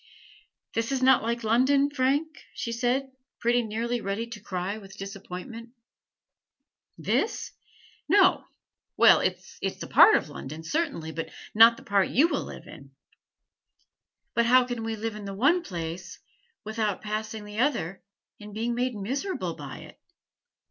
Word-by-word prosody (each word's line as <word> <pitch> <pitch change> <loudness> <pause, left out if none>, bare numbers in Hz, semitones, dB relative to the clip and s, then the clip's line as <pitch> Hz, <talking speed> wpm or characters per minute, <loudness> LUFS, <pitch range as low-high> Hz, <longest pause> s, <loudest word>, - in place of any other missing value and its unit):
"This 230 +3 -1
is 265 -1 0
not 260 -1 +6
like 235 +1 -2
London, 265 +6 +3
Frank?" 280 +2 +1 0.3
she 235 - -4
said, 250 +3 0 0.3
pretty 240 +1 +2
nearly 230 +2 -2
ready 200 +3 -2
to 230 -2 -8
cry 190 +2 -4
with 195 -2 -13
disappointment. 200 +4 -8 1.2
"This? 455 - -1 0.6
No. 380 +1 +5 0.5
Well, - - +7
it - - +1
is - - -18 0.2
like - - -8
a - - -10
part 435 - +8
of - - 0
London, 150 +2 -8
certainly, 280 - -2
but 165 +1 -5 0.2
not 230 +2 +7
the - - -13
part 200 -1 +2
you 290 +7 +4
will - - -1
live - - -10
in." - - -13 1.4
"But 235 0 +2
how 255 +1 +6
can 240 -2 -4
we 225 0 -2
live 220 0 -4
in 210 -1 -8
the 195 0 -6
one 290 - +3
place 175 - -6 0.5
without 215 -2 -2
passing 215 0 -4
the 210 +1 -7
other 215 - 0 0.4
and 210 -1 -10
being 230 +2 -1
made 245 0 -1
miserable 270 - -3
by - - -9
it? - - -14
230 Hz, 155 wpm, -27 LUFS, 200-255 Hz, 1.4 s, part